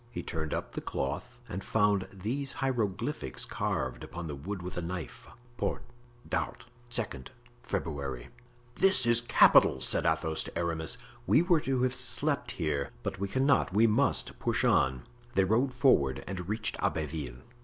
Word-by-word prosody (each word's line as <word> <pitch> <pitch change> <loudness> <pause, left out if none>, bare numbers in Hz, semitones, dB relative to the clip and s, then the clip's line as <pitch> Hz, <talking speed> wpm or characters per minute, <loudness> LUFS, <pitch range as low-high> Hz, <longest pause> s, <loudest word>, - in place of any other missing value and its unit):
He 120 - -5
turned 80 -2 -4
up - - -3
the - - -5
cloth 120 - -4
and 95 +2 -5
found 105 -3 +2
these 120 +9 -3
hieroglyphics 115 - -2
carved 65 -2 -2
upon 85 0 -7
the 75 - -4
wood 90 +7 -5
with 90 0 -6
a 90 - -2
knife: 85 0 -6 0.3
"Port.... - - -2 0.4
D'Art.... - - -3 0.2
2d 105 - -3 0.3
February." 70 - -4 0.5
"This 190 -10 +6
is 120 0 +5
capital!" 105 - +6
said 60 - +1
Athos 80 0 0
to - - -7
Aramis, 85 +5 -1 0.3
"we 160 - +5
were 175 -2 +4
to 130 -2 0
have 130 0 +1
slept - - +1
here, 75 -3 -1
but - - -4
we 100 - -1
cannot—we 125 -3 +3
must 110 -1 +1
push - - 0
on." 65 -1 +3 0.3
They 95 - +5
rode 115 +8 +2
forward 125 - +3
and 90 -1 -5
reached 110 -2 -1
Abbeville. 70 -6 -3
95 Hz, 155 wpm, -30 LUFS, 80-120 Hz, 0.5 s, This